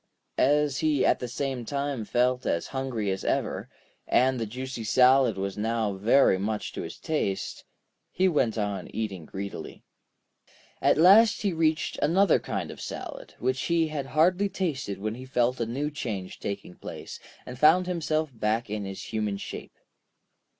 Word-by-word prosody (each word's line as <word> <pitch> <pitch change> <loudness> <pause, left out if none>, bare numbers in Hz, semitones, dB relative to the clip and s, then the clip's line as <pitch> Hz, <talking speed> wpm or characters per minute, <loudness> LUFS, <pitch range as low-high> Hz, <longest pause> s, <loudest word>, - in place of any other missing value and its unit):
As 145 0 +3
he 150 -4 +2
at - - +3
the 125 - -4
same 130 0 -3
time 140 -2 -3
felt 125 +3 +1
as 85 - 0
hungry 125 -7 -2
as 95 - -3
ever, - - -1 0.4
and 130 0 +3
the 115 - -2
juicy 125 +1 -5
salad 125 0 +4
was 100 +1 -3
now 110 -1 0
very 105 +1 +4
much 105 +2 -2
to - - -4
his - - -7
taste, 125 -12 -2 0.5
he 190 +2 +2
went 130 -10 +1
on 105 -2 -2
eating 100 -7 -4
greedily. 100 +4 -7 1.0
At - - +4
last 210 +8 +6
he 200 -3 +1
reached 160 -1 0
another 180 +4 +4
kind - - -4
of - - -10
salad, - - -7
which 130 +2 -1
he 165 -2 +1
had 145 -3 -4
hardly 180 +8 +3
tasted 155 - -3
when 110 +2 -3
he 125 +3 -8
felt 125 0 +1
a 115 - -1
new 140 +6 -2
change 105 -10 -5
taking 100 -3 -5
place, - - -8 0.3
and 125 0 -8
found 160 +5 +6
himself 160 -4 -1
back 110 0 -1
in 105 -1 -3
his 95 0 -6
human 105 -2 -1
shape. - - -8
125 Hz, 165 wpm, -27 LUFS, 105-150 Hz, 1.0 s, last